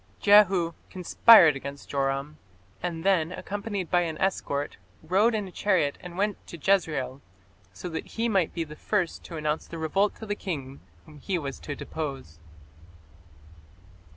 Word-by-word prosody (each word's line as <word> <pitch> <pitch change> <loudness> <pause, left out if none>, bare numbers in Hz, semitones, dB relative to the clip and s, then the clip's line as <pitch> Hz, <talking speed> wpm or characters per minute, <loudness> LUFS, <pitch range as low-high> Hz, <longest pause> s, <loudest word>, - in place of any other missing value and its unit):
Jehu 195 -5 +5 0.2
"conspired 180 - +6
against 140 +1 -8
Joram", 140 +2 -2 0.4
and 165 -2 -4
then, 180 -4 +2
accompanied 200 -1 -4
by 175 - +4
an 165 -2 -3
escort, 145 -7 -1 0.3
"rode 200 +8 +3
in 210 -2 -2
a - - -11
chariot 175 -8 +1
and 180 -1 -9
went 205 0 -1
to 170 - -8
Jezreel", 150 -7 0 0.5
so - - -8
that 160 -2 -5
he 230 +1 -2
might 195 -7 +1
be 170 - -2
the 150 -1 -10
first 185 0 -1
to 165 - -7
announce 155 0 -2
the 165 - -7
revolt 195 +6 +1
to 220 - -9
the 205 - -2
king 140 -10 -5 0.3
whom 150 -1 -14
he 185 +6 -2
was 140 -4 -5
to 145 - -6
depose. 135 - -6
170 Hz, 155 wpm, -27 LUFS, 150-195 Hz, 0.5 s, conspired